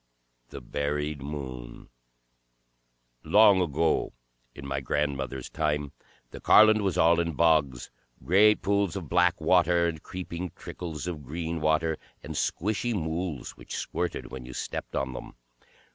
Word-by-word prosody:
The 70 - -9
Buried 75 +3 -3
Moon 65 -5 -7 1.3
Long 105 -2 +6
ago, 80 -1 0 0.4
in 70 - -9
my 70 0 -2
grandmother's 70 -2 -2
time, 75 -2 -1 0.4
the - - -9
Carland 110 0 +6
was 95 -3 -1
all 85 0 +4
in 85 -1 -1
bogs, 75 -6 +2 0.3
great 105 +5 +5
pools 100 -3 +1
of 90 -7 -6
black 90 0 +3
water, 85 +1 +3
and 80 -2 -4
creeping 90 -1 -6
trickles 80 -4 -7
of 85 -5 -5
green 80 +3 -4
water, 80 +1 +1 0.2
and - - -6
squishy 110 +5 -1
mools 80 -4 -3
which - - -9
squirted 90 -1 -3
when 65 -1 -7
you 65 - -9
stepped - - -5
on 65 -1 -2
them. - - -8
80 Hz, 135 wpm, -27 LUFS, 70-90 Hz, 1.3 s, Long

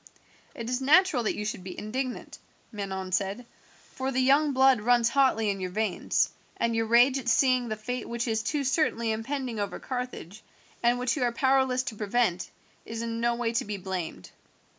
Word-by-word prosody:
"It 230 - -6
is 250 +2 -1
natural 305 0 +4
that - - 0
you 210 - -4
should 215 -3 -4
be 185 -1 -8
indignant," 255 +4 -5 0.3
Manon 190 -3 -5
said, 195 +6 -1 0.5
"for 265 +1 -3
the 260 - 0
young 280 +3 +4
blood 265 -3 +4
runs 240 +1 +3
hotly 235 -6 +2
in 195 - -5
your 185 -1 -3
veins, 215 +1 0 0.3
and 230 0 0
your 225 0 0
rage 245 +4 +5
at 240 -2 -3
seeing 255 -2 +3
the 215 - -2
fate 235 +3 -5
which 235 +1 -2
is 220 -1 0
too 285 +6 -1
certainly 250 -5 +1
impending 240 +1 -3
over 205 - -3
Carthage, 250 -6 -6 0.4
and 240 +1 +3
which 250 0 0
you 290 - -3
are 245 -1 +2
powerless 260 0 +2
to 230 - -5
prevent, 210 -3 0 0.3
is 225 0 -5
in 230 0 -3
no 235 0 +2
way 235 -1 -1
to 245 +3 +1
be 210 -2 -5
blamed. 180 - -5
235 Hz, 190 wpm, -27 LUFS, 215-255 Hz, 0.5 s, rage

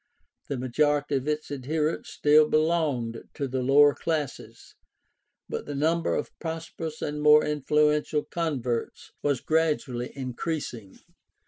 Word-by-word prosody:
The 140 - -2
majority 145 +3 +1
of 135 +2 -5
its 150 -1 -2
adherents 150 +4 -2
still 150 +1 +4
belonged 155 -8 0
to 140 - -2
the 130 0 -2
lower 145 +3 +6
classes, 155 -4 -4 0.7
but - - -5
the 145 - -4
number 160 +4 +1
of - - -3
prosperous 160 -1 -5
and 150 0 -3
more 150 0 +6
influential 150 +1 +1
converts 130 -9 -3
was 140 -4 0
gradually 150 -6 0
increasing. 130 - -5
150 Hz, 120 wpm, -27 LUFS, 130-155 Hz, 0.7 s, lower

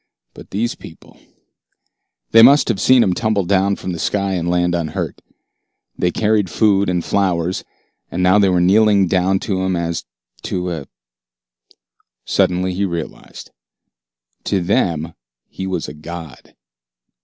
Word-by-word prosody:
But - - -13
these 115 +4 -2
people 80 - -15 1.1
They 115 - +7
must 140 +5 +6
have 100 -5 -1
seen 130 -2 +5
him 95 - +1
tumble 110 -1 0
down 100 +2 +2
from 95 - -6
the 85 - -5
sky 100 +3 -1
and 85 -2 -2
land 90 0 +1
unhurt. 85 -3 -3 0.7
They 90 - 0
carried 105 0 +1
food 100 0 +2
and 90 -2 -1
flowers, 90 -2 0 0.5
and 90 - -2
now 95 +3 +5
they 100 -2 +4
were 90 -1 +2
kneeling 100 +1 +4
down 95 +1 +1
to 95 -2 -2
him 95 -1 0
as 85 -1 -3 0.4
to 90 -1 -3
a 75 -5 -6 1.4
Suddenly 90 +1 +1
he 95 +3 -2
realized. 85 -4 -6 0.9
To 100 - 0
them 85 -3 0 0.3
he 95 - -6
was 90 -3 -3
a - - -8
god. 80 -1 -10
95 Hz, 145 wpm, -18 LUFS, 85-100 Hz, 1.4 s, They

